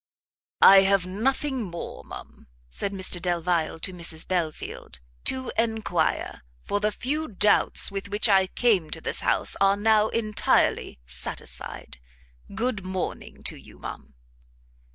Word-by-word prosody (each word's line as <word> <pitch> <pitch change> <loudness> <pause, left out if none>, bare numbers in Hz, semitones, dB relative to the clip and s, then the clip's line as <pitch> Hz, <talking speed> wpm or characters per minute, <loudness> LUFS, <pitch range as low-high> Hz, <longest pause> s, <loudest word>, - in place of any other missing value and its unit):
"I 195 0 +10
have 195 -1 +2
nothing 260 +7 -1
more, 175 -5 -7
ma'am," - - -12 0.2
said 200 - -3
Mr 185 -2 -1
Delvile 175 -2 0
to 185 - -2
Mrs 170 -2 -3
Belfield, 160 - -4 0.3
"to 260 -1 0
enquire, 220 -8 -1 0.2
for 205 - -1
the 210 +1 +1
few 300 +8 -2
doubts 210 0 +3
with 195 0 -5
which 205 +3 +2
I 190 -2 +4
came 195 -8 +1
to 165 - -3
this - - -1
house - - +1
are 195 0 +4
now 215 0 +3
entirely 215 -2 +1
satisfied. - - -5 0.6
Good 225 -3 -1
morning 185 0 -5
to - - -3
you, - - -15
ma'am." - - -9
195 Hz, 135 wpm, -25 LUFS, 175-220 Hz, 0.6 s, I